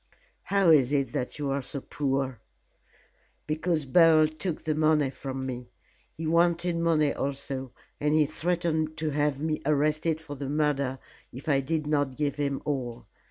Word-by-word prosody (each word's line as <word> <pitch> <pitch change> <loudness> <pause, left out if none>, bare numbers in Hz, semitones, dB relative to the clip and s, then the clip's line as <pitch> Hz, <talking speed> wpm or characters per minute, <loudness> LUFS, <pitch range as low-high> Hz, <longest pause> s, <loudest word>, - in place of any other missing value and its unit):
"How 195 -4 +4
is 140 -4 +5
it 140 -2 +1
that 125 - -3
you 145 -2 -2
are 140 +1 0
so 140 +2 -5
poor?" 135 -2 -2 1.1
"Because 155 0 0
Beryl 155 +2 +6
took 155 +2 -4
the 155 - 0
money 155 -3 +2
from 135 -1 -5
me. 125 -2 -5 0.5
He 160 - -4
wanted 170 +1 +2
money 160 -3 +2
also, 135 -2 -3 0.3
and 150 +1 +2
he 155 -1 +5
threatened 160 0 -1
to 155 -1 -1
have 145 0 0
me 155 -1 -1
arrested 155 +2 +1
for 160 -2 -8
the 140 -1 -5
murder 140 -3 0 0.3
if 130 +5 -10
I 140 -3 +3
did 155 +3 -2
not 145 -3 0
give 145 -2 -1
him 140 -2 -1
all. 125 -5 -3
150 Hz, 160 wpm, -27 LUFS, 135-155 Hz, 1.1 s, Beryl